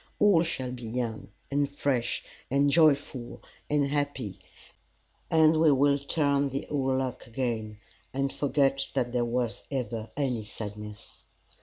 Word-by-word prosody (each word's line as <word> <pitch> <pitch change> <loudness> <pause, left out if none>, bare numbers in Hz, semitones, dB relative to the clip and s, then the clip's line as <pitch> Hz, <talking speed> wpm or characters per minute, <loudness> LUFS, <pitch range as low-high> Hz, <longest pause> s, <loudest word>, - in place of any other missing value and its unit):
All 200 -6 +5
shall 130 -7 -2
be 125 -1 -7
young, 115 -2 -3 0.2
and 140 0 +1
fresh, 135 -4 -1 0.3
and 140 +2 +3
joyful, 145 -5 +2 0.3
and 145 -1 +3
happy, 140 -8 -2 0.9
and 160 -1 +5
we 160 -2 +6
will 140 +1 +4
turn 140 -1 +1
the 135 +1 -3
old 135 -2 +1
luck 130 -1 -3
again, 115 -3 -3 0.3
and 135 +1 -1
forget 140 -1 +1
that 125 -2 0
there 120 -1 +2
was 120 -1 -1
ever 115 -5 -3
any 130 -6 0
sadness. 105 0 -8
135 Hz, 135 wpm, -28 LUFS, 120-145 Hz, 0.9 s, we